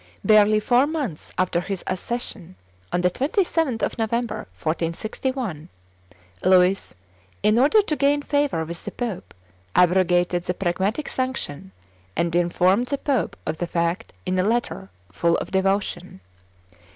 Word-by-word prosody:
Barely 215 0 +5
four 245 +5 +3
months 285 - -4
after 180 -1 +1
his 195 +1 -4
accession, 185 -2 -4 0.4
on 175 - +1
the 180 0 +2
27th 300 - 0
of - - -2
November, 230 +1 -2
1461, 170 - -3 0.7
Louis, 185 +1 +3 0.5
in 215 +2 +4
order 305 - +5
to 310 - -1
gain 290 0 +2
favor 285 - 0
with 170 +1 -6
the - - -4
pope, 235 -7 -5 0.4
abrogated 180 -1 +3
the 180 - -1
Pragmatic 195 - -1
Sanction, 255 - -3 0.4
and 170 0 0
informed 180 +6 +2
the 280 - -1
pope 265 - -1
of 155 - -2
the 175 - -1
fact 170 +5 -1
in 185 0 0
a - - +3
letter 225 - -1 0.2
full 170 - +2
of - - -5
devotion. 190 - -1
195 Hz, 135 wpm, -23 LUFS, 175-245 Hz, 0.7 s, Barely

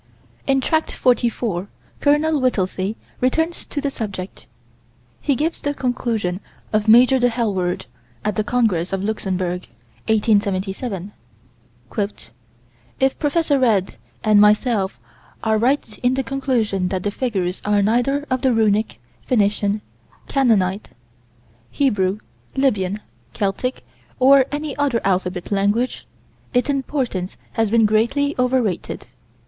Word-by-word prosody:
In 270 -1 +3
Tract 315 +4 0
44, 235 -6 0 0.3
Col. 295 0 +2
Whittelsey 195 -4 0 0.2
returns 320 +7 0
to 290 - -4
the 280 -1 -1
subject. 200 -6 -6 0.7
He 280 - +1
gives 315 +5 -1
the 290 0 -2
conclusion 230 -8 -1 0.3
of 215 0 +1
Major 250 +4 +7
De 245 0 +3
Helward, 200 -7 -1 0.4
at 210 -2 0
the 215 - +1
Congress 210 -7 +1
of 190 0 -1
Luxembourg, 185 -4 -2 0.4
1877: 205 -2 0 1.9
"If 265 0 +1
Prof. 315 +1 0
Read 225 - +2 0.3
and 210 -1 +5
myself 210 -1 +3 0.4
are 220 -1 +2
right 245 -2 +1
in 250 +1 +2
the 270 - 0
conclusion 235 -8 0
that 185 0 -2
the 205 - 0
figures 195 -7 -2
are 205 -1 +2
neither 245 +7 +1
of 255 -1 +1
the 260 -2 +3
Runic, 215 -1 +1 0.3
Phoenician, 205 -3 +1 0.5
Canaanite, 210 -8 +2 0.8
Hebrew, 205 -8 +1 0.4
Lybian, 210 -7 +1 0.3
Celtic, 210 +6 -2 0.3
or 265 0 +6
any 295 0 -3
other 280 -5 +1
alphabet 185 -1 -1
language, 205 +5 0 0.5
its 250 +4 +2
importance 260 -9 -2
has 225 -2 0
been 225 0 +4
greatly 240 +7 +2
over 250 0 +3
rated." 190 -6 -3
225 Hz, 120 wpm, -21 LUFS, 200-265 Hz, 1.9 s, Major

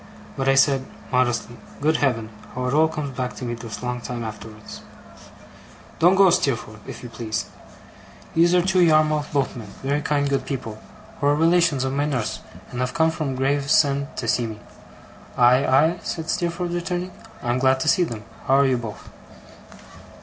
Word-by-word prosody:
But 135 0 0
I 135 - +4
said, 135 -1 +3 0.2
modestly 120 -1 0 0.2
Good 155 +2 +2
Heaven, 115 -5 0 0.2
how 125 0 -2
it 125 - -1
all 155 +2 +5
comes 150 -4 -5
back 125 0 -3
to 125 - -6
me 120 - -3
this 115 -1 -7
long 125 0 -3
time 120 0 -5
afterwards! 110 -1 -9 1.2
'Don't 175 +3 +5
go, 190 -2 +6
Steerforth, 120 - -1
if - - -8
you 120 - -7
please. 110 -1 -3 0.9
These 170 +2 +4
are 180 - +4
two 185 0 +2
Yarmouth 155 -2 +3
boatmen 130 -6 -2 0.2
very 140 +2 0
kind, 145 -1 0
good 140 -1 0
people 115 -6 -5 0.4
who 140 - +1
are 145 - +4
relations 165 -3 +3
of 130 0 -1
my 145 +1 +1
nurse, 125 -7 -2 0.3
and 125 - -5
have 125 0 -2
come 160 -1 +3
from 150 -4 -3
Gravesend 140 +1 +2
to 115 - -3
see 115 +2 +1
me.' 110 -1 -8 0.8
'Aye, 125 +2 +5
aye?' 155 +7 +3
said 160 -1 -3
Steerforth, 175 0 -2
returning. 175 +1 -3 0.3
'I 120 - -2
am 125 - 0
glad 130 0 +3
to - - -2
see 185 - +4
them. 115 -10 -5 0.2
How 135 - +4
are 140 0 +5
you 130 -2 +2
both? 115 -3 -8
135 Hz, 180 wpm, -23 LUFS, 125-160 Hz, 1.2 s, go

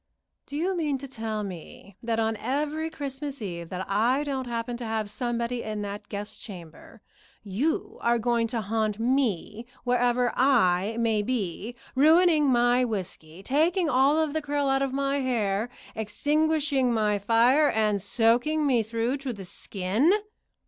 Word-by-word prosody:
"Do 285 - -5
you 365 +4 0
mean 300 -5 0
to 275 +1 -8
tell 220 -4 -4
me 190 +1 -9
that 230 -1 -1
on 220 0 +1
every 295 +7 -2
Christmas 285 -2 -5
Eve 170 -6 -6
that 185 0 -4
I 235 +8 +2
don't 270 -3 -3
happen 235 0 -3
to 240 - -7
have 220 -2 -2
somebody 240 0 -2
in 215 -1 -4
that 205 +1 -7
guest 205 0 -6
chamber, 180 +2 -11 0.4
you 320 - -2
are 235 0 +3
going 235 0 +1
to 230 -1 -2
haunt 215 0 -1
me 230 -3 -1 0.2
wherever 245 0 +2
I 220 -6 +3
may 225 -2 +2
be, 215 -1 -3 0.2
ruining 315 +2 +5
my 245 0 +3
whiskey, 185 -6 -5
taking 320 - +2
all 280 +5 +4
the 310 +1 -3
curl 290 -1 -1
out 270 0 +2
of 275 -1 0
my 275 +1 0
hair, 230 -5 0 0.3
extinguishing 285 +4 +1
my 210 -3 +1
fire, 240 +8 +4
and 215 -2 +1
soaking 245 +9 +2
me 255 -5 +3
through 230 +4 -1
to 270 -2 -4
the 200 -4 -8
skin?" 200 - 0
240 Hz, 155 wpm, -26 LUFS, 215-280 Hz, 0.4 s, ruining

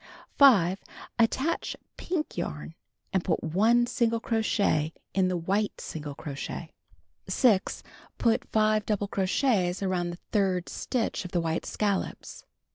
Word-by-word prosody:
5. 200 -10 +6 0.4
Attach 265 +8 +1 0.2
pink 335 -3 -3
yarn, 160 -2 -4 0.4
and 190 -2 +2
put 165 - 0
1 220 +9 +3
single 230 -1 +1
crochet 205 -9 +1 0.2
in 190 -1 +3
the 185 -1 0
wliite 200 +5 -1
single 150 -2 -6
crochet. 145 +3 -6 0.6
6. 205 0 +2 0.3
Put 230 -1 +2
5 215 -1 +3
double 205 -2 0
crochets 195 -1 +1
around 180 -2 0
the 175 - -6
third 190 -4 +1
stitch 235 -5 -2
of 180 - -9
the 175 - +2
white 165 0 -2
scallops. 200 -2 -2
195 Hz, 125 wpm, -28 LUFS, 175-225 Hz, 0.6 s, 5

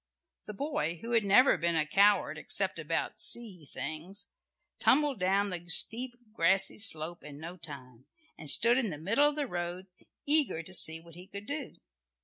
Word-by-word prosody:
The 210 - -9
boy 285 - -4
who 235 - -7
had 230 -2 +1
never 205 +1 +3
been 170 +1 -1
a 155 -1 0
coward 200 +6 +1
except - - -1
about - - -5
"sea 195 -10 0
things," 160 +7 -6 0.5
tumbled 290 -4 +1
down 195 +2 -1
the 175 0 -7
steep 245 +6 +1 0.2
grassy 195 +2 +2
slope 170 -4 0
in 145 -1 -12
no 170 +3 -9
time, 130 -7 -10 0.3
and 155 - -5
stood 235 - +5
in 235 -5 -2
the 155 - -7
middle 225 - 0
of 295 - -8
the 295 -1 -3
road 175 -3 -7 0.4
eager 290 - +7
to 185 - -11
see 160 -2 +5
what 170 0 -19
he 180 +3 -14
could 200 +1 -11
do. 285 +1 -7
190 Hz, 175 wpm, -28 LUFS, 165-235 Hz, 0.5 s, eager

